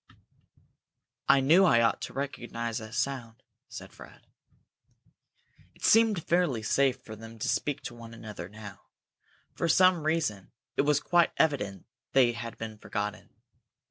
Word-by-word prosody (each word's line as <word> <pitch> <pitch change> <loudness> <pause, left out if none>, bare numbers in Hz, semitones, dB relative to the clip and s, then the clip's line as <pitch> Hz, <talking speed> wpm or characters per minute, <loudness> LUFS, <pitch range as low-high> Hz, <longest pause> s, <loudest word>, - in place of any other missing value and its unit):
"I 140 - +6
knew 165 +8 +5
I 120 -11 +5
ought 115 - +1
to - - -6
recognize 120 -4 -4
that 110 +1 -9
sound!" 125 -2 -3 0.3
said - - -10
Fred. - - -15 1.5
It - - -5
seemed 220 -6 +4
fairly 170 -10 +1
safe 135 +3 +2
for 110 - -8
them 115 +1 -11
to 110 - -3
speak 145 -2 -1
to - - -6
one 115 -1 -11
another 105 -6 -8
now. 105 -1 -11 0.7
For 170 - -1
some 185 -1 +5
reason 150 - -1 0.2
it - - +3
was 145 0 +2
quite 175 +3 +2
evident 105 - 0 0.3
they 130 -3 +5
had 115 0 -7
been 110 -2 -7
forgotten. 105 -1 -4
120 Hz, 140 wpm, -29 LUFS, 110-150 Hz, 1.5 s, I